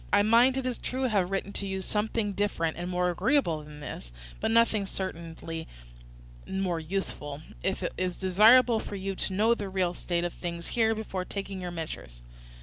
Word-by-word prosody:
"I 205 0 +5
might, 235 +5 +5
it 265 - -1
is 250 -2 -2
true, 260 +1 -2
have 205 -8 +2
written 195 +1 -2
to 200 - -2
you 190 0 -2
something 210 +1 -1
different 190 -5 0
and 175 +2 -4
more 180 0 +1
agreeable 175 - +2
than 150 0 -11
this, - - -7 0.3
but 220 - 0
nothing 225 -3 +3
certainly 165 -3 -5 0.8
more 190 -3 -1
useful, 155 -4 -4 0.2
if - - -1
it - - -2
is 180 -1 -1
desirable 220 +5 +6
for 205 - -6
you 195 0 -3
to 190 - -2
know 220 +4 +4
the 205 -4 -4
real 185 -2 0
state 175 -1 -1
of 175 - -2
things 170 -1 -5
here 225 -1 +2
before 200 -4 -3
taking 195 0 -5
your 180 - -3
measures. 65 - -7
190 Hz, 185 wpm, -29 LUFS, 170-215 Hz, 0.8 s, desirable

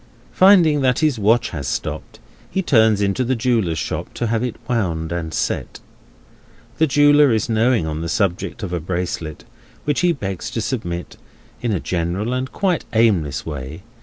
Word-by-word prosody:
Finding 175 -6 +5
that 130 -2 +2
his 150 -7 +1
watch 115 +4 +2
has 70 -6 -5
stopped, - - -4 0.3
he 190 - -1
turns 110 - +4
into 100 +6 0
the 130 +1 0
jeweller's 115 -9 0
shop, - - -4
to 120 - -2
have 115 0 0
it 125 -3 -3
wound 85 -9 -1
and 85 -2 -3
set. - - -3 1.0
The 160 - +4
jeweller 145 0 +5
is 110 -1 +1
knowing 115 -3 +2
on 80 0 -3
the 85 - -3
subject 100 +4 -1
of 90 -3 -4
a 90 - -1
bracelet, 85 -2 -4 0.4
which 145 -1 +1
he 180 -1 +3
begs 95 - -4
leave - - -7
to 115 - 0
submit, 90 -7 -4 0.4
in 120 - -1
a 95 - 0
general 90 +8 -2
and 130 +1 -3
quite 185 -4 0
aimless 100 - +2
way. 75 +3 -7
110 Hz, 175 wpm, -20 LUFS, 85-130 Hz, 1.0 s, Finding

